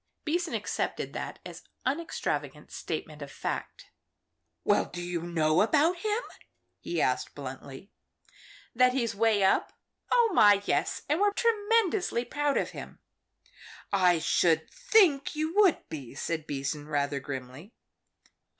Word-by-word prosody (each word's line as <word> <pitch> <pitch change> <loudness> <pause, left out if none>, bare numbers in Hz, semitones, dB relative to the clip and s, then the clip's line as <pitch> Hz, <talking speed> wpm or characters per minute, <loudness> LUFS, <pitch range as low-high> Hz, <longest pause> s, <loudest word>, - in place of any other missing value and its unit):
Beason 340 +2 -1
accepted - - -3
that - - -5
as - - -9 0.2
unextravagant 150 - -3
statement 155 -2 -5
of 140 -1 -7
fact. - - -5 0.7
"Well, 205 - +3
do 175 - -8
you 175 -1 -3
know 165 -1 +2
about 310 - +3
him?" 430 +6 -1 0.6
he 170 - -3
asked, 125 -3 0
bluntly. 135 +5 -9 0.8
"That 250 +1 +4
he's 235 -4 0
'way 210 -1 +2
up? 190 - +2 0.4
Oh, 470 -2 +4
my, 205 - +6
yes. - - 0
And 300 +4 +1
we're 410 0 +3
tremendously 415 - +1
proud 290 +1 0
of - - -1
him." - - -9 1.0
"I 180 -3 +4
should 160 0 +2
think 410 - +3
you 310 +2 -2
would 395 -6 +4
be," 140 -5 -8
said 160 +1 -3
Beason, 145 +1 -4
rather 145 -1 -1
grimly. 135 - -8
200 Hz, 130 wpm, -28 LUFS, -, 1.0 s, my